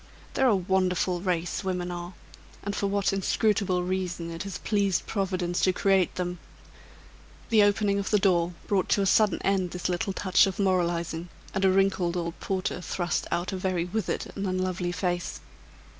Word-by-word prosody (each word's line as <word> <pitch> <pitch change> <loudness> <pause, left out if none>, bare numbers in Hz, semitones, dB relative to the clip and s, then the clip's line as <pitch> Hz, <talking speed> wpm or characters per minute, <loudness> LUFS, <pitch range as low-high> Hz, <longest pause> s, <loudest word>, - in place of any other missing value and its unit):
They're 265 - +3
a 225 - +5
wonderful 185 -1 +1
race 180 0 -1
women 180 -1 -2
are; 175 +1 -6 0.5
and 200 0 -3
for 200 - 0
what 200 0 +1
Inscrutable 195 -1 +1
reason 180 -2 -2
it 165 0 -6
has 195 -1 -5
pleased 200 -4 0
Providence 185 -3 -1
to 185 - +3
create 190 -1 +2
them 180 -1 -3 0.5
" - - -24
The 220 -2 +6
opening 205 0 +3
of 195 - -2
the 210 - +4
door 180 -4 +2
brought 195 -3 0
to 200 - +3
a - - +1
sudden 210 +1 +3
end 190 -2 +1
this 180 +1 -3
little 180 +2 -1
touch 185 0 +4
of 190 - -4
moralizing, 175 -3 0 0.2
and 195 - -1
a 190 - +6
wrinkled 185 -2 +2
old 170 -1 -4
porter 185 -1 -2
thrust 175 0 -2
out 175 +3 -1
a - - -2
very 185 -2 -1
withered 215 +4 -2
and 195 0 -2
unlovely 185 -1 -1
face. 175 -1 -2
185 Hz, 175 wpm, -27 LUFS, 175-195 Hz, 0.5 s, The